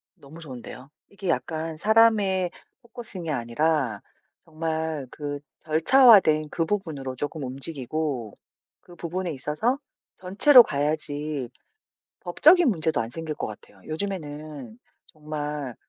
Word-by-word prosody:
너무 145 +4 -14
좋은데요. 130 -3 -10 0.2
이게 195 -2 -6
약간 160 -1 -2
사람에 205 -2 +3 0.3
포커싱이 225 -9 -8
아니라 125 -2 -1 0.4
정말 160 -3 -4
그 145 -1 -5 0.2
절차화된 160 - +5
그 165 - -1
부분으로 160 -9 -3
조금 145 +3 -5
움직이고 135 -2 -3 0.4
그 175 - -16
부분에 175 +1 -4
있어서 150 - -1 0.4
전체로 235 +8 +7
봐야지 145 - -2 0.7
법적인 315 - +5
문제도 160 - 0
안 115 +1 -4
생길 160 +2 -5
것 - - -4
같아요. 105 -2 -12
요즘에는 155 - -6 0.3
정말 150 -4 -6
155 Hz, 265 characters per minute, -25 LUFS, 145-185 Hz, 0.7 s, 전체로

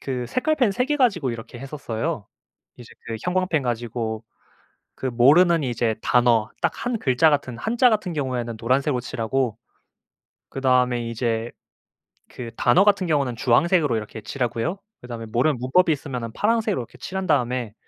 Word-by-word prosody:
그 125 -3 -3
색깔펜 255 - +1
3 250 +5 0
개 295 +1 0
가지고 195 - +2
이렇게 115 +1 -8
했었어요. 135 -2 -4 0.5
이제 120 -1 -13 0.2
그 115 - -4
형광펜 180 -4 0
가지고 115 -2 -3 0.7
그 135 - -5
모르는 150 +7 +5
이제 120 -3 0
단어, 120 -3 +3
딱 - - +1
1 245 -2 -1
글자 135 +2 +3
같은 130 -5 -1
한자 240 +2 +3
같은 210 -5 -1
경우에는 125 -6 -3
노란색으로 130 +3 +1
칠하고 120 -1 -2 0.9
그다음에 125 -3 +1
이제 115 0 -2 0.8
그 120 -2 -8
단어 125 +11 +4
같은 200 -3 +3
경우는 140 -6 0
주황색으로 140 +3 +2
이렇게 110 0 -7
칠하고요. 125 - -2 0.2
그다음에 120 -2 -7
모르는 125 +6 +1
문법이 160 +8 +3
있으면은 130 -6 -4
파란색으로 220 - +1
이렇게 120 - -12
칠한 190 0 -5
다음에 120 -3 0
130 Hz, 355 characters per minute, -23 LUFS, 120-170 Hz, 0.9 s, 모르는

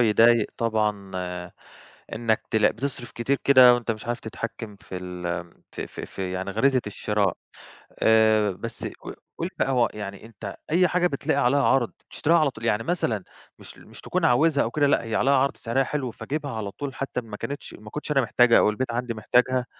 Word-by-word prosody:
يضايق 115 0 +5
طبعًا 105 -3 -1 1.0
إنّك 110 -1 0
تلاق 110 -1 +4
بتصرّف 125 -1 -5
كتير 130 +4 -1
كده 130 -3 +8
وأنت 120 -1 -2
مش 110 +1 -5
عارف 120 0 -2
تتحكّم 110 -1 -6
في 95 - -9
ال 90 -1 -6
آمم 85 0 -5
ف - - -7
ف - - -6
في 95 -1 -5
يعني 95 +1 -3
غريزة 130 +6 +2
الشراء. 105 -2 -1 0.7
آآ 110 -1 +4
بس 95 - -6
ق - - -8 0.2
قٌل - - -2
بقى - - +1
هو 125 -3 +3
يعني 100 -2 -7
أنت 105 -3 -8
أي 180 +3 +4
حاجة 180 0 +2
بتلاقي 140 -2 0
عليها 140 +2 +3
عرض 130 -3 +2 0.2
بتشتريها 170 +3 +2
على 155 -3 +3
طول؟ 115 -3 -11
يعني 115 -1 +1
مثلًا 115 - -1 0.3
مش - - -13
ل - - -16
مش - - -13
تكون 185 -1 -2
عاوزها 155 +1 +4
أو 115 - -2
كده، 145 +3 +2
لأ 140 - +3
هي 115 -1 -4
عليها 135 - +3
عرض، 135 +1 +2
سعرها 130 +3 0
حلو، 135 -4 -3
فاجيبها 140 +6 -5
على 110 -3 -4
طول 140 +6 -6
حتّى 135 -2 -3
إن 115 - -16
ما 105 -2 -7
كانتش 140 +6 -6
ما 105 0 -12
كنتش 150 0 -4
أنا 135 - +4
محتاجها، 120 -1 +4
أو - - +4
البيت 120 +3 -3
عندي 120 0 -2
محتاجها؟ 125 +3 +1
115 Hz, 200 wpm, -25 LUFS, 105-135 Hz, 1.0 s, كده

